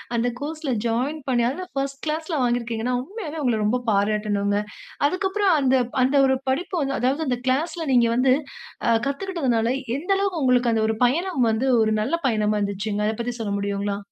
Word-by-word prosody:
அந்த 235 +1 +1
கோர்ஸ்ல 305 -2 -3
ஜாயின் 265 +7 -1
பண்ணி, 240 -2 +2
அதுல 365 +8 -5
1 275 0 -3
கிளாஸ்ல 315 +1 -2
வாங்கி 245 0 +2
இருக்கீங்கன்னா, 230 +1 -2
உண்மையாவே 330 - -7
உங்கள 235 -4 +1
ரொம்ப 240 +4 +1
பாராட்டணுங்க. 205 0 +1 0.5
அதுக்கப்பறம் 380 +1 +1
அந்த 265 0 +3 0.3
அந்த 265 +3 +2
ஒரு 265 - +3
படிப்பு 350 +7 -1
வந்து, 275 0 -1
அதாவது 265 +6 +1
அந்த 250 -2 0
கிளாஸ்ல 320 +6 0
நீங்க 240 -1 +5
வந்து 255 +1 +4 0.5
அ - - +4 0.2
கத்துக்கிட்டதுனால, 275 -7 -1 0.3
எந்த 355 +7 -4
அளவுக்கு 390 -5 -1
உங்களுக்கு 250 -2 +3
அந்த 220 -1 +1
ஒரு 220 - 0
பயணம் 320 +1 +1
வந்து 230 +5 0
ஒரு 220 0 +2
நல்ல 265 +10 0
பயணமா 215 -3 +1
இருந்துச்சுங்க? 200 +1 -2
அத 220 - 0
பத்தி 240 +1 -3
சொல்ல 210 -2 -2
முடியுங்களா? 200 0 -2
255 Hz, 175 wpm, -23 LUFS, 220-310 Hz, 0.5 s, நீங்க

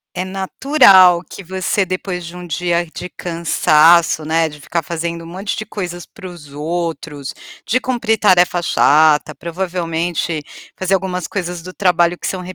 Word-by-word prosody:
é 185 +1 -2
natural 190 - +5
que 200 - -9
você 190 +2 -1
depois 180 -1 -4
de 170 +1 -9
um 180 0 -8
dia 175 +2 -1
de 180 - -7
cansaço, 165 -1 +3
né, 160 0 +1
de 150 0 -12
ficar 170 +3 -2
fazendo 170 +1 -4
um - - -10
monte 190 +4 -4
de 215 - -5
coisas 175 -3 -6
para 190 -4 -11
os 160 -5 -12
outros, 155 -2 -4 0.3
de 255 +4 +1
cumprir 235 -4 0
tarefa 180 -3 +3
chata, 150 -1 +3
provavelmente 170 -2 -3 0.3
fazer 190 +1 +1
algumas 180 -2 -3
coisas 175 -3 -4
do 185 +2 -9
trabalho 175 -2 +2
que - - -8
são 185 -1 -3
175 Hz, 160 wpm, -17 LUFS, 165-185 Hz, 0.3 s, natural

